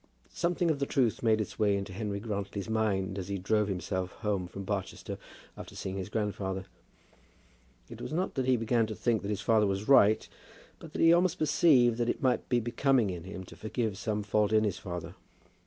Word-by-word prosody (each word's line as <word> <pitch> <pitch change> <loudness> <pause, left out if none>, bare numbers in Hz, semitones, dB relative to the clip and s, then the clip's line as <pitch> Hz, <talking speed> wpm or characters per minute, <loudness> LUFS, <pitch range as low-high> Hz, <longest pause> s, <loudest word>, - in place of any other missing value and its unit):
Something 170 -1 +1
of 145 - -2
the 140 - -1
truth 125 -5 +1
made 110 -2 +3
its 110 - -4
way 100 -2 +3
into 100 -1 -5
Henry 100 0 -3
Grantly's 100 -2 -4
mind 100 -3 0
as 90 - -5
he 100 0 -2
drove 105 +3 +1
himself 95 -1 -3
home 100 -4 0
from 100 +2 -7
Barchester 95 -1 -4 0.4
after - - -10
seeing 95 0 -4
his 95 0 -4
grandfather. 100 -3 -2 1.2
It - - -10
was - - -5
not 180 +4 -1
that 130 -1 -1
he 130 -1 +4
began 115 0 +1
to 110 - -5
think 115 -1 +1
that 100 - -5
his 105 -1 -2
father 110 0 +3
was 100 +2 -2
right, 110 -6 +5 0.5
but 160 -2 -12
that - - -2
he 165 0 +7
almost 175 0 +3
perceived 140 -7 +4
that 120 0 +1
it - - -1
might 130 -2 +1
be 125 - +3
becoming 120 -1 +2
in 85 -1 -7
him 95 -1 -7
to - - -13
forgive 110 -1 -2
some 105 +1 -2
fault 105 0 +1
in 110 0 +4
his 100 -3 -1
father. 90 -2 -6
105 Hz, 205 wpm, -30 LUFS, 95-120 Hz, 1.2 s, he